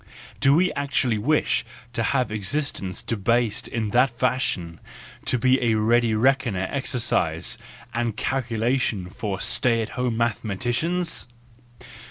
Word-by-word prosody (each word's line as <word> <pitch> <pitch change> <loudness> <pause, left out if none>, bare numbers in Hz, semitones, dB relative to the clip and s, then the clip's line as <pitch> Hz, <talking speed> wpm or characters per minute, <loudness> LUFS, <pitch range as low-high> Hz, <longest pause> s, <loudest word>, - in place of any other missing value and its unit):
do 135 +1 +5
we 180 +3 +3
actually 135 -5 0
wish 150 +8 +1 0.3
to 120 - -1
have 125 0 0
existence 105 -3 -3
debased 115 0 0
in 110 -3 -3
that 125 +4 +4
fashion 120 -9 -1 0.5
to 125 - +1 0.2
a 115 -2 +3
ready 115 +1 +3
reckoner 115 -6 +1
exercise 130 -3 0 0.4
and 120 -2 -1
calculation 120 -5 -1
for 100 -3 -4
stay 115 +1 +3
at 110 - -2
home 125 -2 -2
mathe¬ 115 -1 0
maticians? 125 - 0
120 Hz, 120 wpm, -24 LUFS, 110-130 Hz, 0.5 s, do